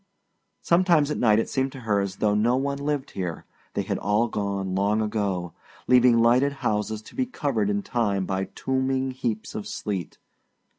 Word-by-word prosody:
Sometimes 170 -4 +3
at - - -2
night 110 -3 +4
it - - +4
had - - -12
seemed 135 0 0
to 135 - -9
her 105 -3 +1
as 100 -1 -2
though 105 0 +1
no 115 +4 +3
one 140 +1 -1
lived 145 -1 -2
here 90 -4 -4 0.3
they - - 0
had - - -2
all 105 +4 +2
gone 100 -3 -2
long 100 +3 +1
ago 100 -5 -1 0.3
leaving 125 -1 +6
lighted 125 +5 +4
houses 105 0 -1
to - - -14
be 260 -1 -1
covered 125 - -1
in 100 0 0
time 100 -5 0
by 95 +1 -1
tombing 130 +2 -1
heaps 115 -4 -3
of 105 - -5
sleet. 95 -6 -4
110 Hz, 185 wpm, -25 LUFS, 100-130 Hz, 0.3 s, leaving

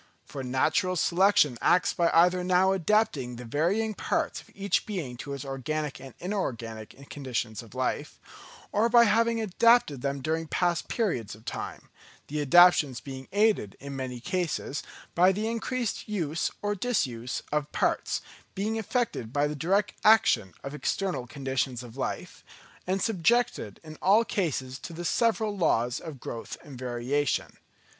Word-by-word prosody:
For 140 - -7
natural 140 +8 +1
selection 175 -7 +3
acts 180 - +3
by 170 -1 +2
either 180 +2 +4
now 185 +1 +3
adapting 185 - +1
the 120 +1 -8
varying 185 - 0
parts - - -1
of - - -21
each 200 0 0
being 170 -12 -4
to 140 +3 -6
its 140 - -7
organic 135 +1 -3
and 135 -2 -11
inorganic 130 - -5
conditions 125 -6 -3
of 115 +1 -15
life; 130 0 -2 0.5
or 220 +3 +2
by 235 0 +7
having 230 +1 +3
adapted 220 - +3
them 140 +1 -2
during 160 +3 -2
past 175 +1 0
periods 125 - -1
of 110 +2 -19
time: - - -6 0.4
the 150 +1 -2
adaptations 145 -3 +6
being 130 0 -8
aided 205 - +2
in 140 0 -7
many 130 -2 -4
cases 160 0 -2 0.3
by 180 +2 +5
the 210 +3 -2
increased 230 -1 -2
use 170 -7 -1
or 205 0 +1
disuse 130 - -2
of 150 -1 -1
parts, - - 0 0.3
being 215 +3 -1
affected 220 - -2
by 145 +2 +2
the 150 - -2
direct 190 +7 +1
action 120 - +4
of 140 - -6
external 150 -3 -2
conditions 130 -1 -2
of 120 -1 -11
life, 135 - -5 0.4
and 190 +1 0
subjected 225 - +1
in 155 -1 -10
all 210 +5 +5
cases 135 - -2
to 170 - -8
the 175 +2 -6
several 220 0 +1
laws 125 - +1
of 155 -5 -8
growth 115 -1 -6
and 135 -4 -11
variation. 130 +3 -1
155 Hz, 150 wpm, -28 LUFS, 130-200 Hz, 0.5 s, by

